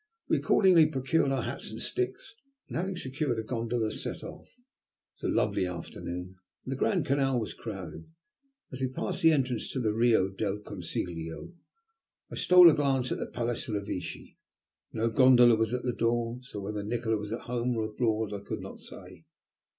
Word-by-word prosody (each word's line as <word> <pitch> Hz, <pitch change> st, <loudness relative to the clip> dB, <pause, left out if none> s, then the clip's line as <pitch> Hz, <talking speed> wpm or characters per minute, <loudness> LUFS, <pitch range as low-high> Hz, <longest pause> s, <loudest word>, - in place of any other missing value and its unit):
We -, -, +3 dB
accordingly 175 Hz, -5 st, +5 dB
procured 135 Hz, 0 st, +1 dB
our 130 Hz, -3 st, 0 dB
hats -, -, -5 dB
and 110 Hz, +1 st, -7 dB
sticks, 125 Hz, -, -3 dB, 0.3 s
and -, -, -8 dB
having 185 Hz, +3 st, -1 dB
secured 130 Hz, -4 st, -2 dB
a 110 Hz, -, -2 dB
gondola, 115 Hz, -1 st, -1 dB
set -, -, -5 dB
off. -, -, -9 dB
It 250 Hz, +1 st, -33 dB
was -, -, +1 dB
a -, -, -1 dB
lovely 95 Hz, -, +1 dB
afternoon, 90 Hz, +1 st, -6 dB, 0.3 s
and 130 Hz, -, -5 dB
the -, -, -1 dB
Grand 175 Hz, +4 st, +1 dB
Canal 135 Hz, -2 st, +2 dB
was 110 Hz, -, -4 dB
crowded. 90 Hz, -7 st, -8 dB, 0.6 s
As 130 Hz, -, -7 dB
we 130 Hz, -, +2 dB
passed 130 Hz, -, -3 dB
the 165 Hz, -, +7 dB
entrance 130 Hz, -6 st, 0 dB
to 130 Hz, -, -3 dB
the 110 Hz, -4 st, +1 dB
Rio 115 Hz, -4 st, +3 dB
del 100 Hz, +1 st, -2 dB
Consiglio, 85 Hz, -, -5 dB, 0.8 s
I -, -, -5 dB
stole 180 Hz, -1 st, +8 dB
a -, -, +1 dB
glance 135 Hz, -4 st, +1 dB
at -, -, -1 dB
the -, -, -3 dB
Palace 120 Hz, -1 st, -3 dB
Revecce. 100 Hz, -4 st, -5 dB, 0.5 s
No 115 Hz, +1 st, 0 dB
gondola 125 Hz, -1 st, +7 dB
was 110 Hz, 0 st, 0 dB
at 125 Hz, 0 st, -2 dB
the 125 Hz, -, -1 dB
door, 115 Hz, +1 st, 0 dB
so 125 Hz, -5 st, -7 dB
whether 105 Hz, +1 st, -4 dB
Nikola 110 Hz, +1 st, -1 dB
was 105 Hz, 0 st, -6 dB
at 115 Hz, -, -3 dB
home 120 Hz, 0 st, -2 dB
or 110 Hz, -, 0 dB
abroad 110 Hz, -1 st, -1 dB
I 100 Hz, -, -4 dB
could -, -, -4 dB
not -, -, -9 dB
say. 90 Hz, -3 st, -12 dB
120 Hz, 185 wpm, -29 LUFS, 105-130 Hz, 0.8 s, stole